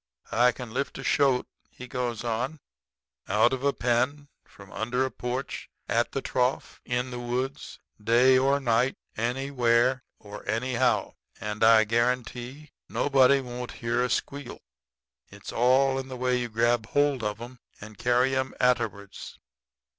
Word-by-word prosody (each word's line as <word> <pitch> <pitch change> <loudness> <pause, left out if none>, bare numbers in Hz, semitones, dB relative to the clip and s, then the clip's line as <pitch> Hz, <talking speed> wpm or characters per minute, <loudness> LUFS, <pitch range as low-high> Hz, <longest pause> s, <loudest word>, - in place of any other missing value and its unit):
I 125 +2 +5
can 120 -2 -9
lift 135 +1 -3
a 135 - -7
shoat,' 135 -2 +2 0.2
he 125 - -10
goes 120 -3 -3
on, 125 +6 -2 0.7
'out 110 +6 +3
of 130 0 -3
a 140 - +3
pen, 130 +4 -1 0.2
from 100 -1 -15
under 125 +4 -1
a 130 - -4
porch, 125 +2 -5 0.2
at - - +1
the - - -3
trough, 125 +1 -1
in 125 +1 -2
the 125 - -5
woods, 125 +3 -4 0.3
day 120 +4 +5
or 135 +2 +3
night, 125 0 +1 0.2
anywhere 125 +1 +1 0.2
or 105 -1 -10
anyhow, 125 +1 0 0.3
and 105 +1 -3
I 110 -1 +7
guarantee 125 +5 -2 0.2
nobody 140 -1 +4
won't 125 -1 -7
hear 120 +1 -1
a 125 - -1
squeal. 140 +2 -3 0.7
It's - - -10
all 130 +3 +3
in 130 - -6
the 130 -1 -7
way 125 0 +1
you 120 -1 -3
grab 115 0 +1
hold 145 -1 +1
of 105 0 -2
'em 120 +1 -10 0.2
and 105 +1 -11
carry 125 +4 +2
'em 130 0 -2
atterwards. 115 -6 -1
125 Hz, 150 wpm, -27 LUFS, 115-130 Hz, 0.7 s, I